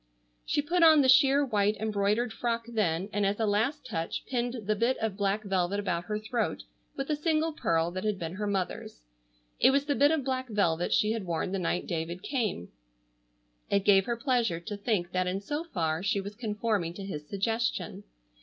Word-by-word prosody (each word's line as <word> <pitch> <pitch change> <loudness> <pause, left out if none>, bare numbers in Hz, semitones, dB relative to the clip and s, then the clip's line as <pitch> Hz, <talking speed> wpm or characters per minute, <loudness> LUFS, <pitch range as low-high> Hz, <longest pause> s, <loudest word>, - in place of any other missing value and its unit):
She 290 - +1
put 350 +4 0
on 315 -3 +7
the - - +3
sheer 275 +2 +6
white 210 -3 +1
embroidered 215 +2 0
frock 230 -1 -2
then, 195 -6 0
and 205 - 0
as 200 +2 0
a 220 - +2
last 220 +9 0
touch 165 -9 -4
pinned 245 -3 -3
the 215 +1 +1
bit 235 +5 +1
of 220 -3 -2
black 200 +1 0
velvet 195 0 0
about 175 -4 -2
her 210 - -2
throat 220 +2 -2 0.3
with 275 +2 -3
a - - +2
single 315 +1 0
pearl 165 - 0
that 185 +2 -5
had 210 -2 0
been 165 -2 -5
her 210 +2 -3
mother's. 185 - -3 0.6
It - - +6
was 280 +1 +2
the 290 - +1
bit 285 +1 +4
of 315 -3 +1
black 260 -1 -2
velvet 175 -5 +1
she 215 - +3
had 225 -3 -3
worn 170 +2 -2
the 195 - -1
night 175 0 -1
David 170 +1 -4
came. 215 - -2 1.0
It 200 -1 +1
gave 195 -1 +5
her 235 -1 -1
pleasure 235 - +1
to 205 +5 -6
think 200 -4 -1
that 185 0 0
in 185 +2 -1
so 295 +10 -4
far 165 - -1
she 200 +1 0
was 200 +1 -6
conforming 210 -5 -2
to 195 - -7
his 150 -6 -6
suggestion. 225 +4 -2
210 Hz, 200 wpm, -29 LUFS, 185-245 Hz, 1.0 s, on